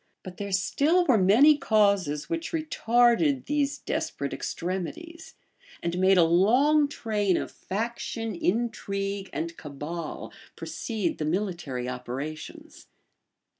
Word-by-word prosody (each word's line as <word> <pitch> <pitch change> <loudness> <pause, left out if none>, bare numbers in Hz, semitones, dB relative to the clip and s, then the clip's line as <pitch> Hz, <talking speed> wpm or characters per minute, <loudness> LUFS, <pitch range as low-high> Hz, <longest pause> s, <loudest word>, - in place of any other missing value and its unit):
But 185 -1 -9
there 200 -1 -5
still 290 - +2
were 260 - +4
many 260 +11 +6
causes 200 - +2
which 335 0 -4
retarded 255 -2 +2
these 290 0 0
desperate - - -3
extremities, 320 - -5 0.5
and 170 +1 -2
made 190 +1 +5
a 175 - +7
long 250 - +4
train 210 -9 0
of - - -4
faction, 225 +2 -4
intrigue, 195 0 -2
and 165 +1 -4
cabal, 150 +3 -6 0.2
precede 215 -7 -3
the 155 - -1
military 170 -8 -2
operations. 125 +5 -7
200 Hz, 110 wpm, -27 LUFS, 170-255 Hz, 0.5 s, a